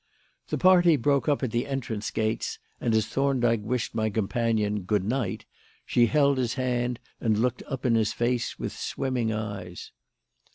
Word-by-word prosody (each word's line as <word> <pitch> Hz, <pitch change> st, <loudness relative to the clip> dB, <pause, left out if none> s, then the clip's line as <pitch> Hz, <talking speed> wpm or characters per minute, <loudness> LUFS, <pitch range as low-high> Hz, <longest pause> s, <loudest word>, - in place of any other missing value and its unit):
The -, -, -2 dB
party 180 Hz, -3 st, +6 dB
broke 140 Hz, +2 st, +1 dB
up 145 Hz, -1 st, +1 dB
at 125 Hz, -, -1 dB
the 120 Hz, +4 st, -1 dB
entrance 120 Hz, -6 st, -3 dB
gates, 110 Hz, 0 st, -2 dB, 0.2 s
and 115 Hz, -2 st, +1 dB
as 110 Hz, -1 st, +3 dB
Thorndyke 120 Hz, -3 st, +1 dB
wished 120 Hz, +2 st, -2 dB
my 110 Hz, -1 st, 0 dB
companion 110 Hz, -1 st, 0 dB
"Good 95 Hz, +1 st, 0 dB
night," 115 Hz, -2 st, -2 dB, 0.4 s
she 120 Hz, -1 st, +3 dB
held 140 Hz, 0 st, +3 dB
his 125 Hz, -1 st, -1 dB
hand 125 Hz, -2 st, -1 dB, 0.2 s
and 110 Hz, -3 st, +1 dB
looked 125 Hz, +2 st, 0 dB
up 135 Hz, -1 st, -5 dB
in 120 Hz, -, +3 dB
his 110 Hz, -2 st, +2 dB
face 120 Hz, 0 st, -1 dB
with -, -, -4 dB
swimming 125 Hz, -4 st, -2 dB
eyes. 100 Hz, -5 st, -5 dB
120 Hz, 165 wpm, -27 LUFS, 110-130 Hz, 0.4 s, party